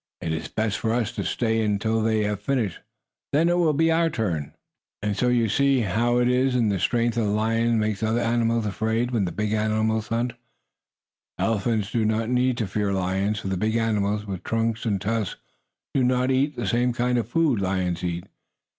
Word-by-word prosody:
It 80 - -3
is 80 +1 -3
best 110 -2 -2
for 110 0 0
us 120 -1 0
to - - -4
stay 115 -2 0
in 105 -1 +1
until 110 +2 0
they 110 -1 +1
have 105 -1 -2
finished. 110 -6 -1 0.5
Then 160 +4 +3
it 175 0 +2
will 165 -3 +3
be 165 +3 +3
our 165 0 +3
turn." 85 - -3 0.5
And 105 -1 0
so 125 - +1
you 120 -2 +3
see 135 +4 +2
how 115 +4 +1
it 125 0 +3
is 125 +1 +2
that 115 -4 +2
the 100 -2 0
strength 120 +4 +1
of 115 -3 +1
a - - 0
lion 115 +2 +1
makes 105 -2 0
the 110 - 0
other 115 +2 +1
animals 115 -1 +1
afraid 110 +4 -1
when 110 -6 +1
the 85 - -3
big 105 0 -2
animals 110 0 0
hunt. 115 +1 -1 1.0
Elephants 110 -1 0
do 115 -1 +1
not 110 +1 0
need 125 0 +2
to 115 - -1
fear 100 +1 -1
lions, 95 +2 -1
for 95 - -4
the 95 - -1
big 110 +3 0
animals, 105 -2 0
with 95 -3 -5
trunks 115 0 -1
and 100 -3 +1
tusks, 105 0 -2 0.5
do 135 - +2
not 125 +1 +2
eat 140 +3 +1
the - - -3
same 120 +1 +1
kind 125 +1 +1
of 115 -1 -4
food 145 -8 +2
lions 95 -2 -1
eat. 85 0 -3
110 Hz, 210 wpm, -24 LUFS, 105-120 Hz, 1.0 s, Then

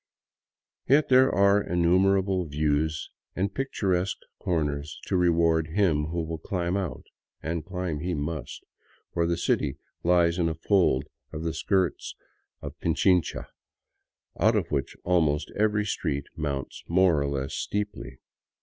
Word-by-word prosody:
Yet 145 +3 +4
there 130 0 +6
are 100 +1 +4
innumerable 95 +2 +2
views 75 +1 -1 0.2
and 100 +2 -1
picturesque 95 -8 -1 0.2
corners 75 -3 -2
to - - -1
reward 85 -2 +3
him 80 -4 +1
who 85 +2 -2
will 80 0 -5
climb 90 +1 -2
out; 95 -5 -3 0.4
and 80 0 -2
climb 90 -3 -3
he 90 +3 -2
must, 75 0 -5 0.5
for 85 -1 +1
the 85 0 0
city 70 -3 0 0.2
lies 85 0 +3
in 85 -1 +2
a 80 - -3
fold 80 -6 +2 0.3
of 80 0 -5
the 80 -1 -1
skirts 95 -1 -1 0.5
of 70 +1 -8
Pichincha, 90 +1 +1 0.9
out - - +4
of - - -1
which 70 -4 -2
almost 80 -5 +1
every 105 0 +1
street 70 -8 -2
mounts 70 -4 -4
more 85 -3 +3
or 70 - 0
less 70 -1 -3
steeply. 100 -11 -4
85 Hz, 135 wpm, -27 LUFS, 75-95 Hz, 0.9 s, there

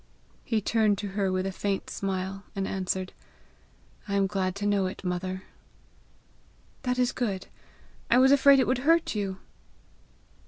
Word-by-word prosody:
He 225 -2 0
turned 215 -1 +2
to 200 0 -4
her 195 -1 0
with 185 0 -1
a 195 - -1
faint 195 +1 -2
smile, 195 0 -3
and 195 -1 -1
answered, 185 -1 -2 0.9
"I 200 - -1
am 200 -1 +3
glad 190 -1 -1
to 205 +1 -4
know 200 -2 +2
it, 185 - -7
mother." 185 +1 -3 1.4
"That 250 -1 -1
is 250 0 +2
good. 200 -7 -2 0.6
I 240 - +5
was 265 +1 +6
afraid 280 0 +7
it 260 - +3
would 255 +1 +1
hurt 330 +4 +3
you!" 200 -3 -2
200 Hz, 155 wpm, -27 LUFS, 190-240 Hz, 1.4 s, afraid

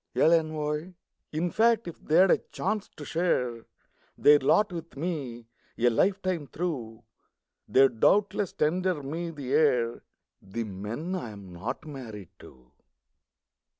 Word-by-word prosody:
L'ENVOI 155 +1 +1 0.4
In 165 +3 -1
fact, 230 -2 +3
if 170 - -9
they'd 175 +5 +5
a - - +4
chance 210 +1 -2
to 145 - -8
share 125 -10 -1 0.5
Their 145 0 +7
lot 195 +8 +3
with 165 -4 -8
me, 140 -8 -4 0.3
a 120 +1 +3
lifetime 185 - 0
through, 130 -9 -4 0.6
They'd 135 -4 +4
doubtless 205 - +3
tender 175 0 0
me 165 +5 -4
the 140 -5 -5
air 125 -6 +2 0.4
The 105 +5 -4
men 110 - -5
I 180 -11 -3
am 100 -4 -11
not 115 - -5
married 115 - -8
to. 65 -1 -16
150 Hz, 125 wpm, -28 LUFS, 120-175 Hz, 0.6 s, Their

